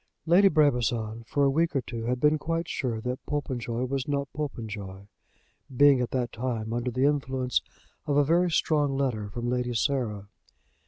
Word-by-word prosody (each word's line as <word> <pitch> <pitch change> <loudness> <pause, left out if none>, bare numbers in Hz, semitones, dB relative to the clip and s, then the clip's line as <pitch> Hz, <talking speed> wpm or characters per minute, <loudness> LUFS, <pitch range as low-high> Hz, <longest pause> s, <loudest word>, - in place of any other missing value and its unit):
Lady 180 +4 +6
Brabazon 120 - +1
for 145 - +1
a 140 - +5
week 165 +2 +1
or 135 - +2
two 115 -2 -6
had 125 +1 -1
been 150 +3 +3
quite 165 +2 -2
sure 120 -8 -2
that 125 +2 -4
Popenjoy 125 -5 -2
was 135 0 -3
not 140 -1 -2
Popenjoy, 105 -9 -6 0.7
being 140 -2 +6
at 125 - -1
that 125 -2 -2
time 115 -2 -3
under 120 +1 -1
the 130 +3 +1
influence 130 -3 0 0.5
of 145 -1 +1
a 145 - +5
very 175 +4 +3
strong 145 -3 +1
letter 115 -7 -1
from 120 +4 -4
Lady 125 0 -1
Sarah. 110 -6 -1
130 Hz, 170 wpm, -27 LUFS, 120-145 Hz, 0.7 s, Lady